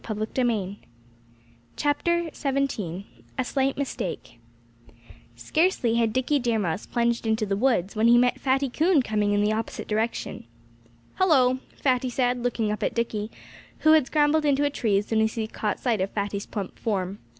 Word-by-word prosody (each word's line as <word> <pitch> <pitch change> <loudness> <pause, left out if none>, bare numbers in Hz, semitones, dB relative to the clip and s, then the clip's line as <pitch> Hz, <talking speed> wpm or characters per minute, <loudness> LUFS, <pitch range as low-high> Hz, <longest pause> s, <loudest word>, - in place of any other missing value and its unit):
XVII 215 -2 -2 1.0
A 275 - -2
SLIGHT 270 +1 0
MISTAKE 235 - -4 1.0
Scarcely 245 - +1
had 230 -1 +2
Dickie 260 +5 +1
Deer 240 -3 0
Mouse 185 -2 -2
plunged 235 -1 0
into 220 0 +1
the 195 -1 -1
woods 210 -4 +1
when 220 +2 +3
he 240 +1 +7
met 245 0 +2
Fatty 270 +1 +1
Coon 310 +3 +2
coming 210 -2 0
in 205 0 +2
the 210 +1 +2
opposite 225 +1 -4
direction. 220 - -2 0.7
"Hullo!" 260 -9 +4 0.2
Fatty 255 -2 +1
said, 245 0 0
looking 230 -3 -1
up 210 - -3
at - - -1
Dickie, 220 -2 -2 0.5
who 310 - +5
had 310 -4 +5
scrambled 300 +1 +2
into 285 -1 +2
a 285 - 0
tree 215 -7 +1
as 205 - 0
soon 220 0 +1
as 220 0 0
he 225 -2 -1
caught 215 -1 -3
sight 230 -6 0
of 190 - 0
Fatty's 200 -1 -3
plump 200 -4 -6
form. 195 -3 -2
235 Hz, 160 wpm, -25 LUFS, 210-270 Hz, 1.0 s, he